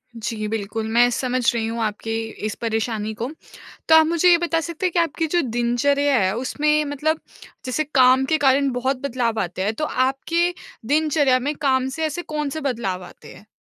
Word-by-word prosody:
जी, 220 -1 -4
बिल्कुल 220 +1 -3
मैं 240 +1 +5
समझ 255 +1 -1
रही 230 -2 -1
हूँ 230 +1 -3
आपके 215 +1 -3 0.3
इस 215 - -3
परेशानी 220 -1 -2
को। 240 - -2 0.6
तो 320 - +7
आप 320 -1 +7
मुझे 335 +2 +2
ये 345 - +6
बता 335 -1 0
सकते 335 +3 -3
हैं 360 - -1
कि 350 - 0
आपकी 330 -1 0
जो 350 - +4
दिनचर्या 255 +3 +1
है 190 -2 +1
उसमें 300 +4 +1
मतलब 300 +2 -1 0.4
जैसे 260 +4 -1
काम 260 0 +5
के 315 - +4
कारण 275 -1 +3
बहुत 255 +2 -1
बदलाव 240 -5 -1
आते 180 +1 -3
हैं। 215 +2 -1
तो 305 - -2
आपके 305 +7 0 0.3
दिनचर्या 290 -2 +2
में 285 +4 -2
काम 265 -3 +1
से 320 - -1
ऐसे 310 +3 -4
कौन-से 300 -2 -4
बदलाव 225 -10 -3
आते - - -14
हैं? 210 - -16
260 Hz, 190 wpm, -22 LUFS, 230-305 Hz, 0.6 s, तो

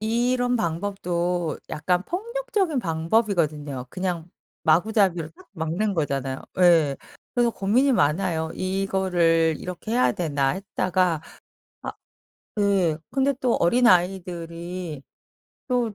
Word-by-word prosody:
이런 245 +3 +1
방법도 175 -3 -1
약간 180 +4 0
폭력적인 415 - -1
방법이거든요. 160 - 0
그냥 180 -2 -3 0.4
마구잡이로 175 -1 +3
딱 - - -17
막는 180 +4 -1
거잖아요. 135 -5 -2 0.2
예. 165 -6 +5 0.4
그래서 240 -1 +3
고민이 240 +7 +2
많아요. 160 -2 +1
'이거를 185 -4 +1
이렇게 180 +5 -6
해야 250 +1 +4
되나.' 145 -5 0
했다가 185 -3 0 0.6
아 - - -4 0.7
예. 190 -6 +2
근데 275 +1 +2
또 250 -4 +2
어린아이들이 175 - +1 0.7
또 245 -4 0
180 Hz, 250 characters per minute, -24 LUFS, 165-220 Hz, 0.7 s, 예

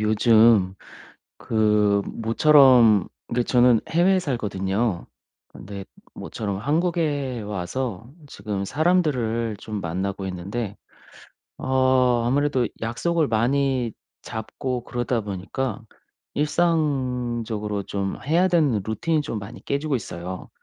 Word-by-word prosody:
요즘 110 -2 +4 0.6
그 105 -2 +2
모처럼 115 - +5 0.3
그 120 0 +1
저는 120 -1 +4
해외에 185 +3 +3
살거든요. 105 - -2 0.4
근데 100 0 -9 0.3
모처럼 100 -3 -5
한국에 145 - -1
와서 105 +3 -4 0.2
지금 100 -5 -4
사람들을 130 - +1
좀 105 0 -6
만나고 95 +3 -3
있는데 100 +4 -4 0.8
어 130 -2 +2
아무래도 135 -1 +1
약속을 155 +8 0
많이 125 +1 +1 0.3
잡고 120 +2 -5
그러다 120 -1 -1
보니까 105 +6 -4 0.5
일상적으로 125 -10 -1
좀 100 0 -3
해야 170 +6 +3
되는 150 - +2
루틴이 155 +9 0
좀 115 -6 -4
많이 105 +4 -9
깨지고 145 +1 -2
있어요. 90 -6 -5
120 Hz, 230 characters per minute, -23 LUFS, 105-140 Hz, 0.8 s, 모처럼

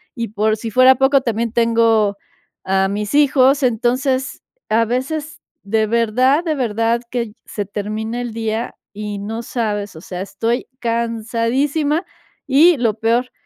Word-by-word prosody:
y 230 -1 -3
por 215 +1 0
si 225 - -5
fuera 255 +2 +6
poco 270 +1 +3
también 230 -1 -1
tengo 230 -3 +3 0.5
a 190 0 +1
mis 210 +5 -3
hijos. 280 -1 +4
Entonces, 255 +3 0 0.3
a 225 +1 +3
veces, 290 +6 -3 0.2
de 215 +1 +1
verdad 245 +7 +2
de 320 -3 0
verdad 230 -1 0
que 235 -4 -3
se 205 -2 -4
termina 215 +4 -4
el 240 -2 -4
día 225 +1 -3 0.2
y 210 0 -5
no 220 +3 -4
sabes, 210 -6 -3
o 160 - -10
sea, 180 -1 -6
estoy 225 +5 -2
cansadísima, 235 - -1 0.4
y 300 +4 +5
lo 225 -4 +1
peor, 240 +3 +1
230 Hz, 145 wpm, -19 LUFS, 215-260 Hz, 0.5 s, fuera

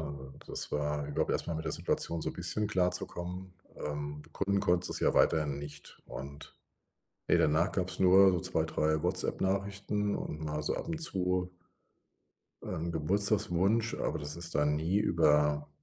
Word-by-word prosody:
un 70 -2 -5
und - - -17
das - - -4
war 75 0 -1
überhaupt 75 - -1
erstmal 85 - -1
mit 80 - -4
der 80 - -1
Situation 85 0 -1
so - - -3
bisschen 90 +5 -1
klarzukommen. 90 -1 -2 0.2
Ähm, 75 0 -4
begründen 100 +5 -1
konnte 90 0 +2
sie - - -4
es - - -3
ja - - +3
weiterhin 75 -3 +3
nicht 75 0 -9
und, 70 +2 -9 0.7
ne, - - +5
danach 80 +5 +3
gab's 95 -1 -1
nur 95 +1 +7
so 90 - +1
2, - - 0
3 80 0 +1
WhatsApp-Nachrichten 100 +3 -1
und 80 +1 -5
mal 75 0 -2
so - - 0
ab - - -5
und 165 - -2
zu 90 - -1 1.1
ähm, 80 +2 -3
'n 85 - -3
Geburtstagswunsch, 100 +5 +1
aber - - -2
das 75 +2 -5
ist 85 0 -4
dann 75 0 +2
nie 80 +6 0
über 75 -5 +3
85 Hz, 165 wpm, -31 LUFS, 75-95 Hz, 1.1 s, nur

